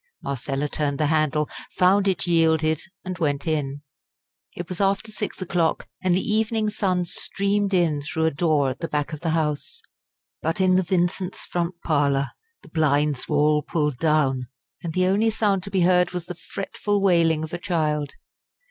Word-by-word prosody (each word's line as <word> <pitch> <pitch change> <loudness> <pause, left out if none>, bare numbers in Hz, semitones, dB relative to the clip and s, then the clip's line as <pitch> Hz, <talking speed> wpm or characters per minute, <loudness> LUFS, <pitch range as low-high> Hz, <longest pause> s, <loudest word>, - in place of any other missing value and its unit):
Marcella 135 +2 -2
turned 145 -1 -1
the 155 - +2
handle, 150 -1 +1 0.3
found 195 +2 +4
it 190 - +1
yielded, 160 -2 +2 0.2
and 185 -1 -5
went 145 -4 0
in. 145 -3 -2 0.7
It 175 - -5
was 180 +2 -4
after 200 +3 +1
six 210 -1 -4
o'clock, 170 -2 0
and 185 -2 +2
the 185 - +1
evening 215 0 +1
sun 185 -4 0
streamed 200 +3 -1
in 170 -6 +2
through 160 +2 -1
a 160 - +3
door 150 -2 +2
at 130 - -5
the 165 - -3
back 150 +1 -2
of 155 - -6
the 170 - -1
house. 160 - -2 0.6
But 165 +2 -1
in 185 -1 +4
the 185 - +4
Vincents' 180 +1 -1
front 175 0 -2
parlour 140 -3 +1 0.3
the - - -15
blinds 145 -3 +1
were 150 - +1
all 150 +1 +3
pulled 150 -3 -1
down, 140 -5 +2 0.3
and 170 -2 -4
the 185 +1 +2
only 205 +4 +3
sound 210 -3 +1
to - - -6
be 190 -2 +1
heard 180 0 +3
was 180 -2 -4
the 180 - -5
fretful 200 +4 -3
wailing 165 -5 +3
of 160 - -7
a 175 - -3
child. 150 -5 -1
165 Hz, 180 wpm, -24 LUFS, 150-185 Hz, 0.7 s, found